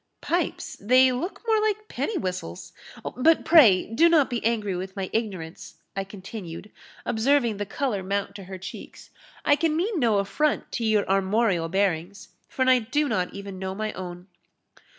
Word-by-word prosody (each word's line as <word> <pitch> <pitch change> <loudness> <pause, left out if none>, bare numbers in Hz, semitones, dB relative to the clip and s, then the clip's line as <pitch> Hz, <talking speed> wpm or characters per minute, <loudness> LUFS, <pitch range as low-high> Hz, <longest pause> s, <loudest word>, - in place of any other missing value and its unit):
"Pipes! 345 -1 -2
they 255 +5 +5
look 270 +10 -4
more 440 -2 +3
like 430 0 -1
penny 430 - -2
whistles 180 - -5 0.4
But, 315 +6 +3
pray, 255 - +7
do 320 +10 +3
not 305 -6 +4
be 240 - -2
angry 215 -4 0
with 190 +1 -6
my 195 -2 -4
ignorance," 185 -9 -4 0.2
I 195 - -1
continued, 195 -1 -9 0.3
observing 240 -1 +2
the 205 0 -4
colour 240 -4 -2
mount 200 +2 -2
to 195 - -10
her 190 +1 -7
cheeks, 190 - -10 0.3
"I 290 - +5
can 315 0 0
mean 380 +2 0
no 230 -6 +3
affront 275 +10 0
to 235 - -3
your 215 -2 +2
armorial 195 -2 +1
bearings, 190 0 -1 0.2
for 260 -1 -1
I 255 -1 +6
do 295 +6 0
not 180 -8 -1
even 200 -1 -7
know 190 0 -4
my 215 +1 -3
own." 180 -1 -7
215 Hz, 170 wpm, -25 LUFS, 190-275 Hz, 0.4 s, pray